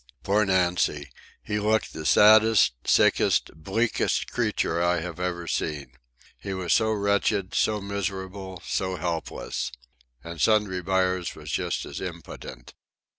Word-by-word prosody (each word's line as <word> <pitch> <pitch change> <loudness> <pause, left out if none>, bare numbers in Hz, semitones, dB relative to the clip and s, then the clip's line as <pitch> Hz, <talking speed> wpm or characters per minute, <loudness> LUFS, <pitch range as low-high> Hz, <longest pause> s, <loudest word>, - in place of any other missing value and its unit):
Poor 105 +2 +2
Nancy! 90 -6 +1 0.3
He 105 0 -2
looked 110 +1 0
the 80 -1 -4
saddest, 110 - +6
sickest, - - +3
bleakest 100 +9 -1
creature 85 +1 0
I 85 0 +2
had 85 +1 -6
ever 90 -1 -3
seen. 75 -6 -3 0.5
He 95 -1 -5
was 90 -2 0
so 110 -1 +3
wretched, 100 -2 0
so 105 -1 +1
miserable, 95 -1 -5
so 95 -1 -1
helpless. 85 -8 -4 0.5
And 85 -1 -7
Sundry 105 -4 +2
Buyers 90 -1 0
was 75 -1 -8
just - - -2
as - - -7
impotent. 60 -1 -8
95 Hz, 125 wpm, -26 LUFS, 85-100 Hz, 0.5 s, saddest